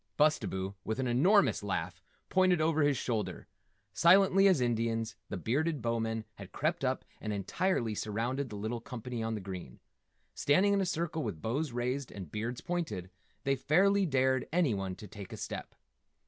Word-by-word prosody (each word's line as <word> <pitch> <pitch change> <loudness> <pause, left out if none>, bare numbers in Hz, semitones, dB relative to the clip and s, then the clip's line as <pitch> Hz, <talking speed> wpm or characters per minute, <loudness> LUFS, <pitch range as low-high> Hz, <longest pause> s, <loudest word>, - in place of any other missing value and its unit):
Bustabo, 100 -11 +1
with 110 - -2
an 130 - -1
enormous 145 - +4
laugh, 90 -3 -3 0.3
pointed 185 -2 +3
over 155 0 +2
his 145 -2 +3
shoulder. 115 -4 -2 0.5
Silently 195 +2 +6
as 185 -7 +4
Indians 115 -2 0
the 105 - -3
Bearded 145 - 0
Bowmen 115 -1 -1
had - - -10
crept - - -1
up - - 0 0.2
and 105 - -3
entirely 110 - 0
surrounded 120 +6 -2
the 105 - -7
little 110 +3 -3
company 125 -2 -5
on 110 0 -1
the 105 - -5
green. 90 -9 -7 0.5
Standing 190 +8 +3
in 200 - +2
a 190 - 0
circle 165 -2 -1
with 105 - -4
bows 135 - -1
raised 125 +3 -2
and 95 -7 -8
beards 115 +3 -3
pointed, 105 - -3 0.3
they 135 0 +2
fairly 190 +8 +3
dared 130 -2 +2
anyone 105 - +1
to 105 - -10
take 100 -1 -10
a - - -6
step. - - -6
120 Hz, 165 wpm, -32 LUFS, 110-155 Hz, 0.5 s, Silently